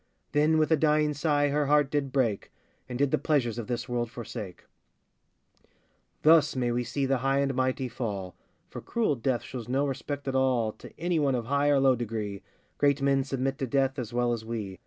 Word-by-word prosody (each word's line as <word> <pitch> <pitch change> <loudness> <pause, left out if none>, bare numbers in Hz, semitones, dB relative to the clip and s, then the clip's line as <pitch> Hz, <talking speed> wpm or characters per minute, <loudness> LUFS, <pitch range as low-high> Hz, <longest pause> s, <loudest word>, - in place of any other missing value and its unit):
[Then 155 +2 +3
with 155 +1 +2
a - - +7
dying 150 0 +2
sigh 145 -1 +1
her 145 0 0
heart 145 -1 +3
did 145 -2 -1
break, 120 -7 0 0.4
And 125 - -4
did 140 0 +1
the - - +2
pleasures 130 -6 0
of 115 - -5
this 120 0 -3
world 120 -2 -2
forsake.] 105 -5 -8 1.6
Thus 160 -2 +5
may 125 -2 0
we 120 +1 0
see 140 +3 -2
the 135 -1 +1
high 135 +2 +1
and 140 -1 +1
mighty 130 0 0
fall, 105 -6 -5 0.3
For - - -8
cruel 225 -11 0
Death 120 0 -1
shows 120 -3 -7
no 135 +3 +1
respect 140 +1 -4
at 135 - -1
all 130 -4 +2
To - - -13
any 170 0 0
one 140 -3 +2
of 120 -2 -3
high 140 +3 +1
or 145 -1 +4
low 135 -1 +4
degree 110 -4 -4 0.4
Great 145 -1 +3
men 135 -1 +2
submit 135 +1 -2
to 135 - -2
Death 135 +2 +1
as 120 -2 -5
well 120 0 +1
as 115 -2 -4
we. 110 -5 -5
135 Hz, 205 wpm, -28 LUFS, 120-145 Hz, 1.6 s, a